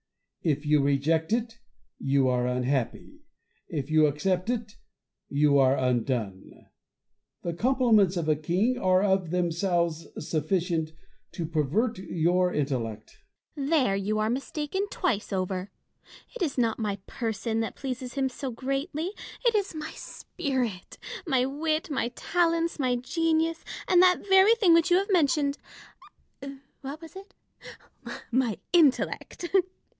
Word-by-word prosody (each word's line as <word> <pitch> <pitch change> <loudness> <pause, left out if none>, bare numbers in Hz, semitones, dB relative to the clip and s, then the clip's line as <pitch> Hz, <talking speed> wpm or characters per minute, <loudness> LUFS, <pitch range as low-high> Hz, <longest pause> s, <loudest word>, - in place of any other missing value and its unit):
If 150 -2 0
you 150 -1 +4
reject 150 +4 +1
it, 230 0 -1 0.4
you 135 -1 +2
are 125 -1 +1
unhappy; 125 0 -2 0.5
if 145 -1 -4
you 155 -1 +5
accept 180 +7 -1
it, 230 -3 -3 0.5
you 145 0 +3
are 135 0 +4
undone. 120 -6 -2 0.8
The 170 - -2
compliments 220 -4 +3
of 165 -2 -2
a 155 - +3
king 185 +12 0
are 185 -1 +3
of 190 -4 +1
themselves 170 -1 0
sufficient 160 +1 -1 0.4
to 170 - -3
pervert 170 - 0
your 180 0 +1
intellect, 120 -8 -3 0.3
Fontanges. 280 -2 -4
There 195 -5 +1
you 200 +2 -1
are 215 +1 +1
mistaken 295 +9 -3
twice 245 - -1
over. 185 0 -2 0.7
It - - -8
is 305 -7 -1
not 230 -2 +1
my 210 -3 -1
person 225 -1 -3
that 225 - -3
pleases 255 -1 -5
him 270 -1 +1
so 265 +1 -5
greatly: 275 +8 -3 0.3
it 470 - +4
is 400 -5 -1
my 310 0 -5
spirit, 250 -9 -4 0.3
my 260 -4 +2
wit, 310 +3 -2
my 265 -4 0
talents, 335 -2 0
my 255 -3 +1
genius, 325 +5 0 0.2
and 360 -1 +5
that 365 +2 +4
very 385 +3 +6
thing 390 -7 +4
which 335 +2 +4
you 350 - +5
have 395 +2 -1
mentioned 290 -4 +2 0.6
— 275 0 -13
what 280 +3 -6
was 325 +2 -13
it? 395 +1 -12 1.0
my 240 -3 +1 0.2
intellect. 335 +2 +2
220 Hz, 135 wpm, -27 LUFS, -, 1.0 s, very